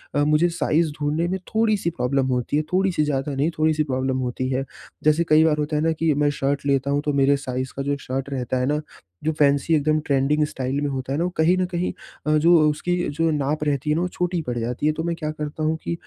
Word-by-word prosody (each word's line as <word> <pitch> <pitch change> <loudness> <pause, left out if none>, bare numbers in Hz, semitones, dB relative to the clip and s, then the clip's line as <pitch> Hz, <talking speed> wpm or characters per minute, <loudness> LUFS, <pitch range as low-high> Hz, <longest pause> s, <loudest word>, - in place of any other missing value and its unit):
अ, 145 - +3
मुझे 150 +4 +3
साइज़ 160 0 +2
ढूँढने 150 +3 0
में 190 +2 -2 0.2
थोड़ी-सी 215 -5 +2
प्रॉब्लम 135 -3 0
होती 125 +2 0
है, 155 - +1
थोड़ी-सी 185 -4 +2
ज़्यादा 140 -1 -1
नहीं 140 +4 +1
थोड़ी-सी 155 0 +2
प्रॉब्लम 130 -2 -1
होती 130 +1 -3
है। 135 +1 -1 0.4
जैसे 155 +2 +3
कई 155 +1 +6
बार 155 -2 +3
होता 150 +1 -2
है 150 - +1
ना 165 +1 +2
कि 160 -2 +2
मैं 145 +1 +2
शर्ट 140 +1 -1
लेता 140 0 +1
हूँ 145 0 +1
तो 145 - 0
मेरे 140 0 +4
साइज़ 130 -1 -4
का 135 - -3
जो 140 - -1
एक 140 - -5
शर्ट 135 +1 -4
रहता 130 -2 -2
है 125 - +1
ना, 150 +2 0 0.4
जो 160 - +1
फ़ैन्सी 145 +1 +2
एकदम 155 +1 +2
ट्रेंडिंग 140 +2 +2
स्टाइल 135 -1 -3
में 145 - 0
होता 130 -1 -4
है - - -1
ना 165 - +1
वो 180 - 0
कहीं 165 +3 +3
न 185 - +1
कहीं 180 0 -2 0.4
अ, 155 0 +4
जो 170 +3 +5
अ, - - +4
उसकी 175 +4 -1
अ, - - -2
जो 165 +3 0
नाप 150 +1 -1
रहती 145 0 -1
है 150 - +3
ना 165 - 0
वो 180 - 0
छोटी 180 -1 -2
पड़ 120 -1 -2
जाती 120 +5 -3
है, 155 - +4
तो 160 - -4
मैं 170 0 -1
क्या 155 -2 -4
करता 150 0 -5
हूँ 155 +1 +1
कि - - -2
150 Hz, 265 wpm, -23 LUFS, 135-160 Hz, 0.4 s, कई